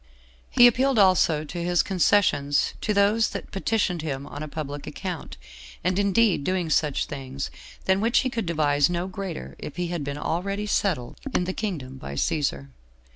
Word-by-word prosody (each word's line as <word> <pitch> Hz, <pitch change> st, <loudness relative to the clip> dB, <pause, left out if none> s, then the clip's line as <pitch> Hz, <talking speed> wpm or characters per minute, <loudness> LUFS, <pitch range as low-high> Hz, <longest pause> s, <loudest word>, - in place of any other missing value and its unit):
He 245 Hz, -, +7 dB
appealed 255 Hz, +2 st, +4 dB
also 185 Hz, -6 st, +4 dB
to 170 Hz, +3 st, -5 dB
his 175 Hz, 0 st, +2 dB
concessions 180 Hz, -7 st, +2 dB
to -, -, 0 dB
those 210 Hz, +2 st, +3 dB
that -, -, -7 dB
petitioned 195 Hz, -3 st, 0 dB
him 140 Hz, -3 st, -4 dB
on 145 Hz, -, -8 dB
a 155 Hz, -, -4 dB
public 145 Hz, -2 st, -6 dB
account, 175 Hz, +2 st, -6 dB, 0.5 s
and 185 Hz, +3 st, +1 dB
indeed 200 Hz, -4 st, +3 dB
doing 180 Hz, -1 st, -1 dB
such 150 Hz, -2 st, +1 dB
things, 135 Hz, -1 st, -5 dB, 0.3 s
than 190 Hz, +1 st, +3 dB
which 230 Hz, +3 st, +3 dB
he 260 Hz, -, -1 dB
could 230 Hz, -6 st, -3 dB
devise 145 Hz, -3 st, +2 dB
no 175 Hz, 0 st, -1 dB
greater 190 Hz, -3 st, -6 dB
if 150 Hz, -, -7 dB
he 175 Hz, -1 st, -2 dB
had 170 Hz, -4 st, -3 dB
been 140 Hz, 0 st, -4 dB
already 195 Hz, +7 st, -2 dB
settled 185 Hz, -11 st, -1 dB, 0.2 s
in -, -, +3 dB
the 185 Hz, +1 st, -3 dB
kingdom 150 Hz, -13 st, -4 dB
by 70 Hz, -, -7 dB
Cæsar. 70 Hz, -, -1 dB
175 Hz, 175 wpm, -25 LUFS, 145-200 Hz, 0.5 s, He